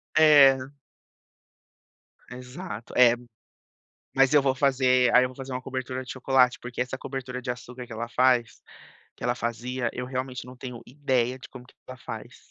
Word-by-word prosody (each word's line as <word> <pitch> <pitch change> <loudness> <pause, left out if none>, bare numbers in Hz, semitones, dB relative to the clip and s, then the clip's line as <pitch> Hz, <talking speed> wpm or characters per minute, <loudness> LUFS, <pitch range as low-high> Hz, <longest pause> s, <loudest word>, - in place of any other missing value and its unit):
É. 145 -4 +7 1.7
Exato, 125 -3 -8
é, 120 -1 +7 1.0
mas 135 +1 +4
eu 145 - +6
vou 135 -1 +1
fazer, 130 -2 +3
aí 125 0 +7
eu - - -1
vou 130 - -14
fazer, 135 -1 -7
uma 125 - -3
cobertura 130 0 -4
de 125 - -10
chocolate, 130 -1 +2
porque 120 0 -7
essa 125 +1 -2
cobertura 130 -2 -6
de 125 - -3
açúcar, 125 0 -7
que 115 - -11
ela 115 +1 -5
faz 125 -3 +1 0.5
que - - -16
ela - - +1
fazia, 120 +2 -3
eu 125 0 -5
realmente, 130 -1 -5
não 125 0 -11
tenho 125 -2 -8
ideia, 130 -2 -1
de 130 - -11
como 125 -1 -12
que - - -21
ela 130 - -9
faz, - - -10
125 Hz, 175 wpm, -26 LUFS, 125-130 Hz, 1.7 s, É